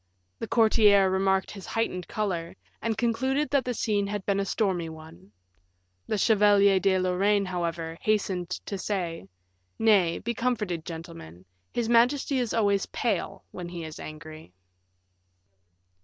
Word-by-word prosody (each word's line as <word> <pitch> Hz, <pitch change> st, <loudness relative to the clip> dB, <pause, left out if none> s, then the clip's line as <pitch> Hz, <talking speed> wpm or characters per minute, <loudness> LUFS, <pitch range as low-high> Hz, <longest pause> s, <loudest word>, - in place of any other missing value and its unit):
The -, -, -4 dB
courtiers 210 Hz, -4 st, +4 dB
remarked 190 Hz, 0 st, +1 dB
his 195 Hz, -2 st, -9 dB
heightened 185 Hz, -6 st, -2 dB
color, 180 Hz, -6 st, -3 dB, 0.3 s
and 225 Hz, -1 st, -1 dB
concluded 260 Hz, +5 st, 0 dB
that 280 Hz, -2 st, +3 dB
the 250 Hz, -1 st, -2 dB
scene 205 Hz, -3 st, 0 dB
had 205 Hz, -1 st, -4 dB
been 200 Hz, -1 st, +1 dB
a 200 Hz, -, 0 dB
stormy 185 Hz, -5 st, -1 dB
one. 155 Hz, -, -13 dB, 0.8 s
The 215 Hz, -, -1 dB
Chevalier 200 Hz, -2 st, +4 dB
de 190 Hz, 0 st, +2 dB
Lorraine, 195 Hz, +2 st, +2 dB
however, 170 Hz, -2 st, -3 dB
hastened 195 Hz, -4 st, 0 dB
to 195 Hz, +1 st, -5 dB
say, 175 Hz, -, -3 dB, 0.5 s
"Nay, 200 Hz, -7 st, +3 dB
be 235 Hz, +2 st, -3 dB
comforted, 210 Hz, -9 st, -2 dB
gentlemen, 160 Hz, -, -9 dB, 0.3 s
his 235 Hz, -2 st, -1 dB
majesty 250 Hz, +4 st, +3 dB
is 240 Hz, -3 st, -1 dB
always 200 Hz, -3 st, +1 dB
pale 195 Hz, -3 st, -2 dB
when 175 Hz, -1 st, -7 dB
he 175 Hz, -1 st, -6 dB
is 155 Hz, -1 st, -8 dB
angry." 155 Hz, -, -10 dB
195 Hz, 140 wpm, -27 LUFS, 170-220 Hz, 0.8 s, courtiers